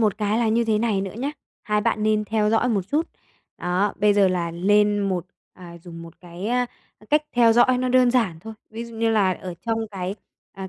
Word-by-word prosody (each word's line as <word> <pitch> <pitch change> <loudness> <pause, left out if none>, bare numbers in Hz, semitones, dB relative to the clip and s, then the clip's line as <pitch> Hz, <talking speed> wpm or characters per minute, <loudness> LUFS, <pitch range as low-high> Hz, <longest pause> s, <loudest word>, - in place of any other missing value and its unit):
Một 215 -1 +1
cái 210 +1 0
là 235 -2 +1
như 235 +2 +2
thế 220 -2 +1
này 220 -4 0
nữa 195 -1 -5
nhá, 280 +3 -2 0.3
hai 210 0 0
bạn 210 - 0
nên 215 0 +1
theo 215 0 0
dõi 225 +3 +2
một 205 -5 +1
chút. 310 +3 +1 0.5
Đó, 185 +3 0
bây 205 0 +3
giờ 200 -2 +4
là 175 -2 -1
lên 205 +4 +2
một 180 -2 -2 0.3
à, 170 -2 -12
dùng 165 -2 -10
một 165 -1 -13
cái, 175 +2 -8
a, 245 +1 +1 0.4
cách 300 0 +4
theo 235 -2 +5
dõi 250 +2 +4
nó 255 - -1
đơn 250 -1 +4
giản 220 -10 +1
thôi. 220 +4 -9 0.2
Ví 230 +2 -6
dụ 230 -1 -11
như 225 0 +1
là 200 -4 +3
ở 180 -1 -7
trong 225 0 0
cái, 190 -1 -4 0.4
à, 190 -1 -7
210 Hz, 230 wpm, -23 LUFS, 185-230 Hz, 0.5 s, theo